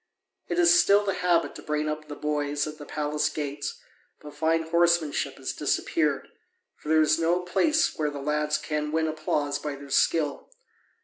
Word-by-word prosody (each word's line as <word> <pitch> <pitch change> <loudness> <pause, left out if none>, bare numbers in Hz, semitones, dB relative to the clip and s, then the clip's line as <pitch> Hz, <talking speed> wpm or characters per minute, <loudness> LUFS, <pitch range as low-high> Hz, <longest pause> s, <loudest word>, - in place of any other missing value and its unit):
It - - -2
is 345 0 +6
still 200 +1 +4
the 195 - 0
habit 180 -2 +1
to - - -10
bring 150 0 -2
up 155 0 -4
the 145 - -7
boys 145 -1 -1
at 155 0 -8
the 145 - -10
palace 150 0 -1
gates, 145 -1 -5 0.4
but 150 -1 -11
fine 160 +2 +1
horsemanship 170 -2 +1
has - - -4
disappeared, - - 0 0.5
for 150 - -10
there 160 0 +5
is 155 +1 +2
no 170 +2 +2
place 305 - +1
where 150 -1 +1
the 145 - -7
lads 150 +1 0
can 150 -1 -3
win 160 0 +1
applause 150 -2 -1
by 145 -1 -4
their 140 0 -11
skill. 150 -2 +1
155 Hz, 180 wpm, -26 LUFS, 150-165 Hz, 0.5 s, is